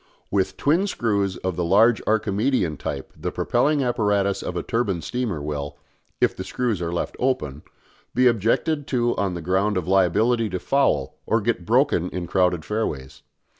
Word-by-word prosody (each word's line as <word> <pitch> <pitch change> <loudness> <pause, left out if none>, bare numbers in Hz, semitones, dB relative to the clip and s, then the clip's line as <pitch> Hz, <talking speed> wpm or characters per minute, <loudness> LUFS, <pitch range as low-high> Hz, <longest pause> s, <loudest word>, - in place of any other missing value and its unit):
With 95 -1 0
twin 170 +8 +2
screws 100 - 0
of 95 -2 -3
the 90 - -1
large 105 +7 +4
Archimedean 105 - +1
type 70 -1 -5
the - - -4
propelling 145 -1 +1
apparatus 105 -5 +1
of - - -4
a - - -2
turbine 105 -8 -1
steamer 110 -11 -3
will 75 -1 -4 0.4
if - - +2
the - - -5
screws 115 -7 -2
are 85 -1 -2
left 85 - -3
open 75 - -1 0.5
be 130 +1 +4
objected 125 +6 +1
to 120 -2 +1
on 95 -2 -1
the 85 - -6
ground 95 +4 +1
of 90 -2 -3
liability 105 +5 +2
to 90 -1 -3
foul 110 - +1
or 115 - +3
to 105 - -8
get 105 -7 -1
broken 120 - +2
in 90 -1 -4
crowded 90 -2 +1
fairways. 75 -12 -3
100 Hz, 170 wpm, -23 LUFS, 90-120 Hz, 0.5 s, large